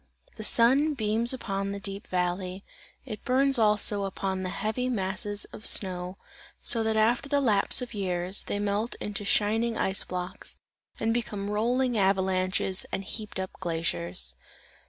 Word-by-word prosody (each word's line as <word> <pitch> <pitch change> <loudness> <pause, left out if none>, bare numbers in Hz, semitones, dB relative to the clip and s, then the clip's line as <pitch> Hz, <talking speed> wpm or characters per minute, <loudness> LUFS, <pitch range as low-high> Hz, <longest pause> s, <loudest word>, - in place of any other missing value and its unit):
The 220 - -7
sun 270 +8 +3
beams 225 0 +3
upon 200 -6 -3
the 200 - -5
deep 195 0 -5
valley, 180 +1 -2 0.4
it 215 -6 -7
burns 270 0 +4
also 210 -2 +2
upon 190 -1 -3
the 185 - -3
heavy 220 +7 -2
masses 205 -1 -2
of 215 - +5
snow; 180 -1 +2 0.5
so 230 - +5
that 220 0 0
after 235 +5 +2
the 285 0 +2
lapse 220 -2 +3
of 245 - -8
years, 185 -1 +1
they - - -3
melt 205 +3 -1
into 205 0 -2
shining 220 +3 +1
ice 190 0 0
blocks, 180 0 -6 0.4
and 225 0 +1
become 210 -4 -3
rolling 240 +2 +1
avalanches 190 -1 +1
and 195 - -3
heaped 210 0 -5
up 190 0 -4
glaciers. 90 - -2
205 Hz, 150 wpm, -27 LUFS, 190-225 Hz, 0.5 s, of